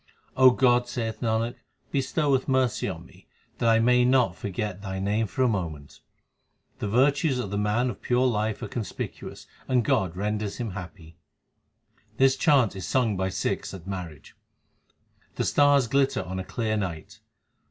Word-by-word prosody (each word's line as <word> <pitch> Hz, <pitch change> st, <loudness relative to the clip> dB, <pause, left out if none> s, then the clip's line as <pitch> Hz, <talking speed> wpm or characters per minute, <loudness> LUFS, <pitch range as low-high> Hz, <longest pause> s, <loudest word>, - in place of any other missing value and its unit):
God, 125 Hz, -1 st, +5 dB
saith 115 Hz, -2 st, -4 dB
Nanak, 115 Hz, +1 st, 0 dB, 0.4 s
bestow 140 Hz, +1 st, +1 dB
mercy 130 Hz, -6 st, +1 dB
on 85 Hz, -2 st, -7 dB
me, -, -, -20 dB, 0.3 s
that 115 Hz, -, +2 dB
I 115 Hz, -, +5 dB
may 125 Hz, +2 st, +4 dB
not 125 Hz, -7 st, +3 dB
forget 100 Hz, 0 st, -4 dB
Thy 95 Hz, -2 st, -5 dB
name 105 Hz, +3 st, 0 dB
for 130 Hz, +7 st, -1 dB
a -, -, +4 dB
moment! 80 Hz, -10 st, -4 dB, 0.8 s
The -, -, -2 dB
virtues 135 Hz, -, +2 dB
of 105 Hz, -6 st, -4 dB
the 100 Hz, -, -2 dB
man 110 Hz, +5 st, +1 dB
of 105 Hz, -, -12 dB
pure 125 Hz, +1 st, +1 dB
life 110 Hz, -3 st, -1 dB
are -, -, -3 dB
conspicuous 115 Hz, -4 st, -6 dB, 0.2 s
and 125 Hz, -3 st, +2 dB
God 90 Hz, -4 st, +1 dB
renders 105 Hz, 0 st, -2 dB
him 115 Hz, -4 st, -4 dB
happy. 90 Hz, -3 st, -10 dB, 1.0 s
This 135 Hz, 0 st, +4 dB
chant 135 Hz, -, +3 dB
is 95 Hz, -, -6 dB
sung 120 Hz, -5 st, +1 dB
by 95 Hz, 0 st, -1 dB
Sikhs 95 Hz, -, -3 dB
at 90 Hz, -3 st, -11 dB
marriages: 90 Hz, -7 st, -7 dB, 1.0 s
The -, -, -1 dB
stars 145 Hz, -2 st, +4 dB
glitter 135 Hz, +3 st, +1 dB
on 95 Hz, +1 st, -5 dB
a -, -, -3 dB
clear 110 Hz, +2 st, -2 dB
night. 100 Hz, +2 st, -5 dB
110 Hz, 160 wpm, -26 LUFS, 95-125 Hz, 1.0 s, God